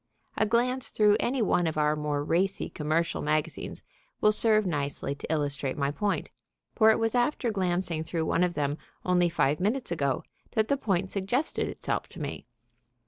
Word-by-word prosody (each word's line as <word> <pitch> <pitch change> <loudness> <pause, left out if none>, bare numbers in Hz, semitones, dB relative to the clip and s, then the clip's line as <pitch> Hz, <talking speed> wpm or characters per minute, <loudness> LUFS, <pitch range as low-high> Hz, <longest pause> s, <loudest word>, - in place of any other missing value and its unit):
A 220 - +2
glance 250 +3 +1
through 210 -1 +4
any 250 -1 +1
one 175 -4 +2
of 155 - -2
our 150 0 +3
more 150 -1 -1
racy 185 +6 0
commercial 160 +2 0
magazines 150 0 -2 0.4
will 215 - +5
serve 215 -1 +3
nicely 140 -4 -2
to 140 - -7
illustrate 145 -3 -1
my 140 -1 0
point, 205 +6 -1 0.4
for 220 -1 +5
it 220 - +5
was 225 -1 0
after 245 0 +1
glancing 175 -4 0
through 160 0 -2
one 165 - +2
of 175 -1 0
them 145 0 -1 0.3
only 180 -1 +3
five 150 -3 +1
minutes 215 +4 -1
ago 140 -5 0 0.3
that 220 0 +1
the 280 - +4
point 190 -7 -1
suggested 225 +10 -1
itself - - -3
to - - -11
me. - - -5
175 Hz, 175 wpm, -28 LUFS, 150-215 Hz, 0.4 s, will